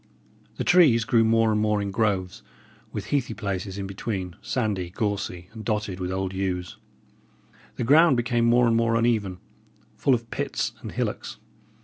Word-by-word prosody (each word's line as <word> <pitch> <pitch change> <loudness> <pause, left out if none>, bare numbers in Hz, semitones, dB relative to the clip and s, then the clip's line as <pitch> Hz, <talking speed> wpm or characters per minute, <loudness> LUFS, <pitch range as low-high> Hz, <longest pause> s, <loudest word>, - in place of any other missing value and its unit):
The - - -3
trees 145 -11 +5
grew 115 -1 +4
more 115 0 +3
and 105 0 +1
more 105 -1 +1
in 100 -1 -3
groves, 95 -4 -1 0.5
with - - -5
heathy 130 -6 0
places 100 -2 -4
in 100 - -4
between, 95 -2 -4
sandy, 105 -8 -2
gorsy, 95 -2 -3
and 110 -1 -8
dotted 105 -4 -2
with 90 0 -3
old 95 0 -2
yews. 90 -2 -3 1.0
The - - -3
ground 150 +3 +5
became 120 0 +1
more 120 +1 +4
and 115 -1 +3
more 115 0 +2
uneven, 110 -5 +1 0.6
full 135 - +3
of 115 -1 -7
pits - - -2
and - - -7
hillocks. - - -3
110 Hz, 160 wpm, -25 LUFS, 95-115 Hz, 1.0 s, trees